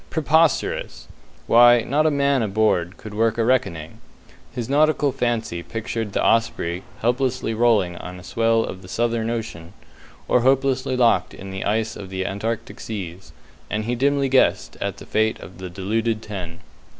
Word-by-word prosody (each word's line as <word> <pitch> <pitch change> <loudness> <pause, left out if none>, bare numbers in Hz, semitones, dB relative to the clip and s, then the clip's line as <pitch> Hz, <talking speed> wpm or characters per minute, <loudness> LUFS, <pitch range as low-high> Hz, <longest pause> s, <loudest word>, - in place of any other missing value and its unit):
Preposterous; 160 -1 +1 0.4
why, 120 0 +6
not 145 +7 +1
a - - +5
man 140 -2 +2
aboard 105 -3 +1
could 110 -3 -10
work 115 +1 +1
a 115 - +1
reckoning! 85 -11 -1 0.5
His 120 -2 -4
nautical 150 0 +3
fancy 120 -8 -2
pictured 110 +2 -4
the - - 0
Osprey 115 -6 +1 0.2
helplessly 125 0 0
rolling 110 -7 +2
on 90 +1 -8
the 90 - -12
swell 115 +2 +1
of 95 - -6
the 90 - -13
Southern 115 +2 -1
Ocean, 110 -7 -5 0.5
or 125 - +3
hopelessly 130 0 +1
locked 120 -2 +2
in 95 0 -9
the 95 0 -4
ice 110 +1 0
of 95 -2 -8
the 95 0 -3
Antarctic 115 +3 -4
Seas, 95 -4 -7 0.4
and 105 0 -2
he 120 - -1
dimly 140 +2 +1
guessed 130 0 +2
at - - -3
the - - -11
fate 110 0 0
of 95 - -12
the 95 -1 -6
deluded 110 +5 -2
ten. 90 -5 -7
115 Hz, 160 wpm, -22 LUFS, 95-125 Hz, 0.5 s, why